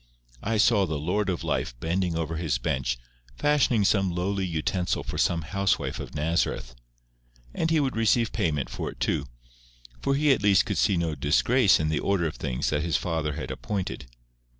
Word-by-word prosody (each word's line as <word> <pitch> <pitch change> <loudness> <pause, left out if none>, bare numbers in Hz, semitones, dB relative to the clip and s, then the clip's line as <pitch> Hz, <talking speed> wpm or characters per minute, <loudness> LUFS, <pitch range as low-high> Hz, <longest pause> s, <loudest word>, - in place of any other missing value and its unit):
I 110 +1 -1
saw 105 -2 +4
the 80 -2 -2
Lord 95 +7 -1
of 90 - -2
Life - - -2
bending 85 +3 -1
over 80 0 -2
His 80 -6 0
bench, - - -1 0.4
fashioning 130 - +2
some 95 -2 +3
lowly 95 +2 -1
utensil 90 +2 -1
for - - -5
some 85 -1 +1
housewife 100 +5 -1
of - - -8
Nazareth. 75 -5 -1 0.8
And 160 - 0
He 165 -1 +3
would 135 -5 0
receive 115 +1 +2
payment 75 -5 0
for - - -4
it - - -12
too; - - 0 0.7
for 140 - +1
He 150 +1 +3
at 135 - +2
least 100 -2 +4
could - - -2
see 95 - +3
no 85 -2 0
disgrace 90 - +3
in 75 0 0
the 75 - 0
order 100 -4 +1
of 80 - -3
things 65 -4 -2
that 75 -1 +1
His 80 -1 +1
Father 80 -3 -2
had - - -5
appointed. 95 -10 -4
90 Hz, 185 wpm, -26 LUFS, 75-105 Hz, 0.8 s, saw